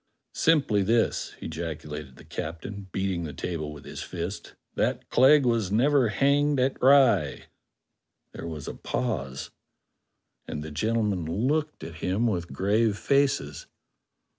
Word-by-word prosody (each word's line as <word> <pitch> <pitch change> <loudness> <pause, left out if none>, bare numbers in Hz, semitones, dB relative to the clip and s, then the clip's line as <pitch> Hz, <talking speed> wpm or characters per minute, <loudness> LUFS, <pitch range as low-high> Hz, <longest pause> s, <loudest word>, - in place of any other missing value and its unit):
"Simply 140 -11 +3
this," 115 +4 +1
ejaculated 75 -4 -6
the - - -15
captain, 95 +5 -6
beating 95 -2 -1
the 75 -3 -5
table 80 +1 -4
with 75 -1 -11
his - - -7
fist, 90 +3 -6 0.2
"that - - -1
Clegg 135 +2 +6
was 115 -6 +1
never 130 +3 +4
hanged 140 +6 +2
at 130 +1 0
Rye." 125 - +4 0.9
There - - -7
was 80 -3 -6
a - - -4
pause, 70 - -3 1.0
and 75 - -5
the 80 - -7
gentlemen 105 +1 0 0.2
looked 150 - -1
at 80 0 -8
him 95 +6 0
with 90 -7 -1
grave 105 +2 +1
faces. 135 - 0
100 Hz, 130 wpm, -27 LUFS, 80-125 Hz, 1.0 s, Clegg